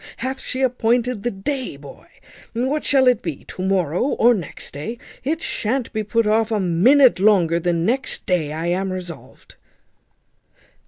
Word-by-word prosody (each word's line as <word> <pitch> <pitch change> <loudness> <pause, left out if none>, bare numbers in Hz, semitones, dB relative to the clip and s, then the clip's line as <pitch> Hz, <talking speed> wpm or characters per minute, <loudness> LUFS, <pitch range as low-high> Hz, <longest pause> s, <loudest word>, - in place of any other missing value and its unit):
Hath 260 +2 -4
she 260 - -5
appointed 245 -2 +1
the 240 - -1
day, 240 - -4
boy? 140 -1 -13 0.5
What, 260 +6 -1
shall 265 -2 +3
it 250 -3 +4
be 160 -6 -5
to - - -8
morrow 185 -4 0
or 245 -3 +3
next 180 -9 -6
day? 150 +12 -6 0.3
It 315 +5 -2
shan't 245 +3 -2
be 215 - -1
put 230 +2 +1
off 220 +1 +2
a 220 -2 0
minute 220 +9 +4
longer 185 -5 +3
than 170 -1 0
next 250 +2 -1
day, 170 -5 0
I 160 +2 -4
am 185 +2 -1
resolved." 180 -3 -9
215 Hz, 160 wpm, -21 LUFS, 175-250 Hz, 0.5 s, it